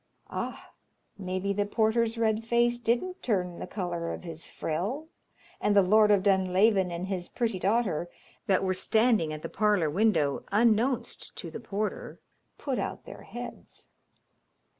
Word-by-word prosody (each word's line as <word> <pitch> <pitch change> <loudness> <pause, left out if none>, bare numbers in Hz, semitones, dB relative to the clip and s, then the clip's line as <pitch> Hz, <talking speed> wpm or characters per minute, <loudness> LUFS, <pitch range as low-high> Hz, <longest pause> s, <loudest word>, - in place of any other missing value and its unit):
Ah! - - -5 0.4
maybe 185 0 -2
the 205 +1 0
porter's 225 +1 +1
red 220 -1 +1
face 240 +1 +2
didn't 240 +11 -1
turn 180 -6 -1
the - - -5
colour 175 -4 -3
of - - -6
his 165 -2 -8
frill, 220 - -3 0.5
and 205 - +2
the 200 - +7
Lord 210 +3 +5
of 200 -2 +4
Dunlavin 190 0 +3
and 170 +1 -4
his 185 -2 -3
pretty 225 -6 -1
daughter, 190 -5 0 0.4
that 195 -2 +3
were 185 -1 +1
standing 220 -3 +2
at 155 0 -6
the - - -3
parlour 205 -8 +1
window 165 -7 +2
unknownst 235 +3 +1
to 170 - -7
the - - -6
porter, 215 -2 -4 0.4
put 270 -4 -2
out - - -4
their - - -10
heads. - - -9
205 Hz, 150 wpm, -28 LUFS, 180-225 Hz, 0.5 s, the